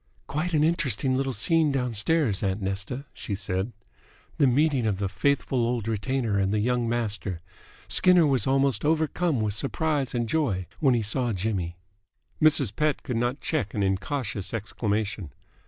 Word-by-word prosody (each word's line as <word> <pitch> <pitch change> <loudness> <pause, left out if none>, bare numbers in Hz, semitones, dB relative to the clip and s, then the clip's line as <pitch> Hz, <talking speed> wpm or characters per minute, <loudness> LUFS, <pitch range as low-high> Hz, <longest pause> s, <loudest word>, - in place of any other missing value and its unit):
"Quite 160 +4 -2
an 150 - +3
interesting 135 -6 +1
little 135 0 0
scene 155 +7 +2
downstairs, 125 - 0
aunt 95 0 -1
Nesta," 100 +7 -4
she 100 - -4
said. 95 +2 -2 0.7
"The 140 - +5
meeting 135 -2 +2
of 100 -3 0
the 100 0 -1
faithful 130 +6 0
old 120 -2 0
retainer 115 -1 0
and 95 0 +1
the 105 - +1
young 120 +1 0
master. 105 -7 -2 0.5
Skinner 180 -2 +5
was 135 -6 +2
almost 135 -4 +2
overcome 160 -2 +1
with 105 -2 0
surprise 140 +2 -1
and 120 -1 0
joy 110 - 0
when 135 -5 +4
he 115 - 0
saw 120 +3 +1
Jimmy!" 95 -3 -2 0.7
Mrs. 140 -9 +4
Pett 150 -2 0
could 125 - -3
not 120 +4 -1
check 120 - -2
an 100 - +1
incautious 100 +2 -2
exclamation. 105 - -3
120 Hz, 155 wpm, -26 LUFS, 100-140 Hz, 0.7 s, The